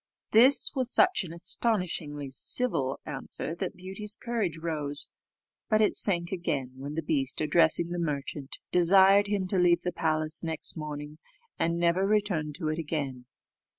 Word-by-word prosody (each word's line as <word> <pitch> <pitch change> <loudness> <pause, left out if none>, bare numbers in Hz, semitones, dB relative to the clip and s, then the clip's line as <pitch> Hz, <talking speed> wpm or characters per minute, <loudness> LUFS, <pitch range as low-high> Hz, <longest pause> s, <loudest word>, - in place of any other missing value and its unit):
This 250 +6 +6
was 255 -3 -2
such 365 - +3
an 170 - -8
astonishingly 170 - -2
civil 135 - 0
answer 135 +4 -5
that 180 +2 -5
Beauty's 195 +3 -5
courage 220 -10 -3
rose: 150 -3 -4 0.6
but 215 -2 +3
it 215 - +2
sank 170 -4 +3
again 145 -8 -3
when 140 +3 -7
the 165 - -3
beast, 135 -4 0
addressing 160 +2 +4
the 175 - -3
merchant, 145 -3 -3
desired 195 +3 +5
him 200 -2 -1
to 190 - +1
leave 175 -1 +3
the 180 - -3
palace 155 0 -1
next 160 -1 -3
morning, 150 -1 -7 0.4
and 170 +1 0
never 175 +3 +2
return 200 -8 0
to 160 +1 -4
it 155 +1 -2
again. 140 -6 -4
170 Hz, 150 wpm, -28 LUFS, 150-195 Hz, 0.6 s, This